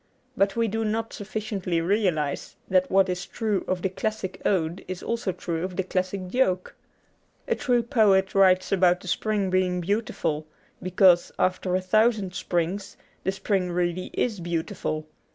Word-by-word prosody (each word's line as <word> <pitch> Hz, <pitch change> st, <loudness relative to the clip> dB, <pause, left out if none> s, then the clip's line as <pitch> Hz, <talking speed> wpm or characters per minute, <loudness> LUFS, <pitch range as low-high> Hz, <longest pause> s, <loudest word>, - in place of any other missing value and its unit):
But 195 Hz, -2 st, +2 dB
we 230 Hz, 0 st, +2 dB
do 225 Hz, +2 st, -1 dB
not 225 Hz, +1 st, -2 dB
sufficiently 200 Hz, -4 st, -3 dB
realize 165 Hz, -6 st, 0 dB
that 185 Hz, 0 st, +2 dB
what 195 Hz, 0 st, +4 dB
is 180 Hz, +1 st, -3 dB
true 215 Hz, -4 st, -1 dB
of 185 Hz, -1 st, -1 dB
the 190 Hz, -, +1 dB
classic 190 Hz, 0 st, -4 dB
ode 170 Hz, -2 st, 0 dB
is 185 Hz, -1 st, -6 dB
also 230 Hz, -4 st, -1 dB
true 170 Hz, -2 st, -4 dB
of 185 Hz, -1 st, -4 dB
the 190 Hz, -, 0 dB
classic 185 Hz, +1 st, -2 dB
joke. 185 Hz, -6 st, +1 dB, 0.7 s
A -, -, +2 dB
true 245 Hz, -2 st, +1 dB
poet 200 Hz, -5 st, +3 dB
writes 185 Hz, -1 st, +4 dB
about 180 Hz, -2 st, +3 dB
the -, -, -11 dB
spring 205 Hz, 0 st, 0 dB
being 185 Hz, -1 st, +1 dB
beautiful 175 Hz, -5 st, -1 dB, 0.3 s
because 185 Hz, -1 st, +4 dB
(after 185 Hz, 0 st, +1 dB
a 185 Hz, -, +1 dB
thousand 215 Hz, 0 st, +2 dB
springs) 180 Hz, +3 st, -2 dB, 0.3 s
the 190 Hz, -, +1 dB
spring 195 Hz, -2 st, -1 dB
really 175 Hz, +1 st, -1 dB
is 220 Hz, -6 st, 0 dB
beautiful. 160 Hz, -2 st, -3 dB
185 Hz, 155 wpm, -26 LUFS, 180-205 Hz, 0.7 s, what